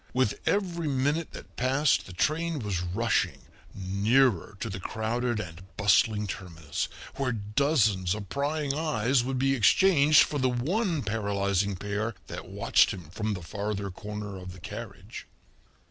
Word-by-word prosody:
With 130 Hz, -5 st, +1 dB
every 175 Hz, -5 st, 0 dB
minute 145 Hz, +4 st, 0 dB
that -, -, -11 dB
passed 135 Hz, +3 st, +2 dB
the 95 Hz, -, -9 dB
train 160 Hz, -, 0 dB
was 100 Hz, -8 st, -2 dB
rushing 100 Hz, +7 st, 0 dB, 0.3 s
nearer 100 Hz, +2 st, +2 dB
to -, -, -3 dB
the 95 Hz, -3 st, -5 dB
crowded 115 Hz, +4 st, -1 dB
and 85 Hz, -4 st, -7 dB, 0.2 s
bustling 105 Hz, +1 st, +3 dB
terminus, 85 Hz, -6 st, -4 dB, 0.3 s
where 135 Hz, -2 st, 0 dB
dozens 105 Hz, -, +1 dB
of 105 Hz, -2 st, -7 dB
prying 145 Hz, -, -1 dB
eyes 140 Hz, -5 st, +1 dB
would 130 Hz, +1 st, -2 dB
be 135 Hz, +1 st, +2 dB
exchanged 150 Hz, -, +6 dB
for 145 Hz, -, -2 dB
the 130 Hz, -1 st, +2 dB
one 160 Hz, -, 0 dB
paralyzing 100 Hz, -2 st, 0 dB
pair 105 Hz, +4 st, -3 dB
that -, -, -8 dB
watched -, -, +3 dB
him 85 Hz, -4 st, -7 dB
from 105 Hz, +2 st, -2 dB
the 90 Hz, -, -7 dB
farther 100 Hz, +3 st, -3 dB
corner 105 Hz, 0 st, -6 dB
of 90 Hz, 0 st, -8 dB
the 95 Hz, -, -12 dB
carriage. 105 Hz, +1 st, -8 dB
110 Hz, 145 wpm, -28 LUFS, 100-135 Hz, 0.3 s, exchanged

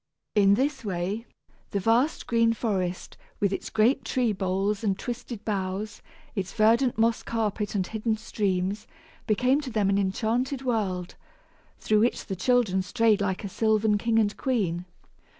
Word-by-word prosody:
In 200 Hz, -1 st, +5 dB
this 270 Hz, +2 st, -1 dB
way, 195 Hz, +3 st, -3 dB, 0.4 s
the 200 Hz, -, -1 dB
vast 235 Hz, -, +2 dB
green 230 Hz, -1 st, +3 dB
forest, 190 Hz, -6 st, -2 dB, 0.2 s
with 200 Hz, -1 st, +1 dB
its -, -, -4 dB
great 225 Hz, +5 st, +2 dB
tree 245 Hz, -4 st, 0 dB
boles 195 Hz, +2 st, -1 dB
and 195 Hz, -3 st, +1 dB
twisted 235 Hz, -2 st, -6 dB
boughs, 200 Hz, +1 st, -3 dB, 0.3 s
its 190 Hz, -4 st, -3 dB
verdant 230 Hz, +3 st, +3 dB
moss 230 Hz, 0 st, +2 dB
carpet 215 Hz, -2 st, -2 dB
and 190 Hz, -2 st, +1 dB
hidden 220 Hz, +2 st, -2 dB
streams, 200 Hz, -2 st, -2 dB, 0.4 s
became 255 Hz, +7 st, +2 dB
to 280 Hz, -, -6 dB
them 210 Hz, -4 st, +1 dB
an 200 Hz, -, +2 dB
enchanted 235 Hz, +7 st, -1 dB
world, 195 Hz, -8 st, -2 dB, 0.6 s
through 215 Hz, -1 st, +2 dB
which 235 Hz, +3 st, +1 dB
the 195 Hz, -, -4 dB
children 215 Hz, -2 st, +2 dB
strayed 215 Hz, +2 st, +2 dB
like 190 Hz, -1 st, -1 dB
a -, -, -3 dB
sylvan 215 Hz, +1 st, +2 dB
king 230 Hz, +1 st, +1 dB
and 210 Hz, -2 st, +2 dB
queen. 185 Hz, -10 st, -1 dB
215 Hz, 150 wpm, -26 LUFS, 195-230 Hz, 0.6 s, In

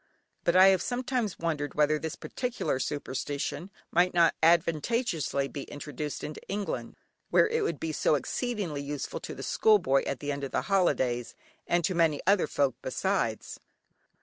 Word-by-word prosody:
But 170 Hz, -, +2 dB
I 190 Hz, +1 st, +8 dB
have 190 Hz, -1 st, +3 dB
sometimes 245 Hz, -4 st, -2 dB
wondered 150 Hz, -4 st, -2 dB
whether 150 Hz, 0 st, +3 dB
this 160 Hz, 0 st, -4 dB
particular 245 Hz, -, -3 dB
superstition 145 Hz, +4 st, -3 dB, 0.2 s
might 175 Hz, +1 st, +3 dB
not 170 Hz, -1 st, +5 dB
advantageously 165 Hz, -, +2 dB
be 140 Hz, -, -6 dB
introduced 150 Hz, 0 st, -6 dB
into 150 Hz, -, -6 dB
England, 200 Hz, 0 st, -4 dB, 0.3 s
where -, -, +5 dB
it 460 Hz, +1 st, 0 dB
would 420 Hz, -, -2 dB
be 160 Hz, -, -2 dB
so 155 Hz, -, +2 dB
exceedingly 185 Hz, -, -2 dB
useful 140 Hz, 0 st, -4 dB
to -, -, -7 dB
the -, -, -7 dB
school 215 Hz, -1 st, +4 dB
boy 135 Hz, -7 st, +2 dB
at 135 Hz, -, -2 dB
the 145 Hz, 0 st, -3 dB
end 140 Hz, 0 st, -4 dB
of 135 Hz, -, -4 dB
the 125 Hz, -, 0 dB
holidays, 130 Hz, -10 st, +1 dB, 0.3 s
and 175 Hz, 0 st, +2 dB
to 185 Hz, -, +1 dB
many 165 Hz, -4 st, +2 dB
other 195 Hz, -3 st, +4 dB
folk 140 Hz, -3 st, +1 dB
besides. 130 Hz, -, -2 dB
160 Hz, 165 wpm, -29 LUFS, 145-195 Hz, 0.3 s, I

